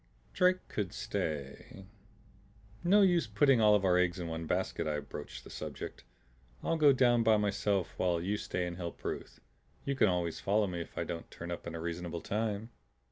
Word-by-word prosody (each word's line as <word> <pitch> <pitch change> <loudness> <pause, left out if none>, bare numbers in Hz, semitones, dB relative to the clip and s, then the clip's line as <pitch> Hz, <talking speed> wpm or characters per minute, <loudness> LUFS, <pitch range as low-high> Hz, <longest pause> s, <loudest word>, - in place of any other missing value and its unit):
Drake 185 0 +3
could 100 -4 -3
stay 75 +6 -4 1.0
"No 200 +4 +6
use 175 -9 +3
of 105 - -21
putting 135 +1 +5
all 105 -1 +6
our 90 -1 +4
eggs 90 0 +2
in 85 -2 -4
one 80 0 -4
basket," - - -1
I 75 -1 0
broached 60 -3 -8
the - - -12
subject. - - -7 0.6
"I'll - - +1
go 150 -3 +6
down 120 -3 +4
by 110 -1 +5
myself 100 -2 0
while 90 -2 +1
you 100 +5 -1
stay 90 -3 -2
and 85 0 -5
help 85 -2 -7
Ruth. - - -5 0.5
You 140 - 0
can 120 -6 +4
always 85 -2 -1
follow 100 -1 +1
if 85 -1 -6
I - - 0
don't 85 -1 -6
turn 85 +1 -7
up 85 - -5
in 85 - -5
a - - -4
reasonable 85 0 -4
time." 110 +1 -2
95 Hz, 190 wpm, -32 LUFS, 85-115 Hz, 1.0 s, No